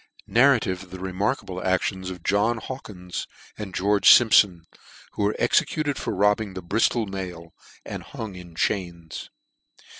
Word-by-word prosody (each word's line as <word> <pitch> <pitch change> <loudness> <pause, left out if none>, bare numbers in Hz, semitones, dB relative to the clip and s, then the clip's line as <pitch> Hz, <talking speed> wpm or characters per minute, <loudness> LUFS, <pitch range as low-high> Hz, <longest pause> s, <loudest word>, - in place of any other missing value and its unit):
Narrative 120 -7 +3
of 95 - -13
the 95 +1 -9
remarkable 95 0 -2
Actions 95 0 -1
of 90 -2 -8
JOHN 105 +4 +2
HAWKINS, 100 -8 -7 0.3
and 105 -3 -7
GEORGE 100 +2 +3
SIMPSON, 100 -7 +6 0.5
who - - -5
were 105 +1 +1
executed 150 -3 +1
for - - -3
robbing 105 0 +1
the 95 - -6
Briftol 110 +4 +1
Mail, 90 -4 -7 0.3
and - - -6
hung 110 -3 -7
in 90 -2 -12
Chains. 85 -3 -3
95 Hz, 140 wpm, -24 LUFS, 90-105 Hz, 0.5 s, SIMPSON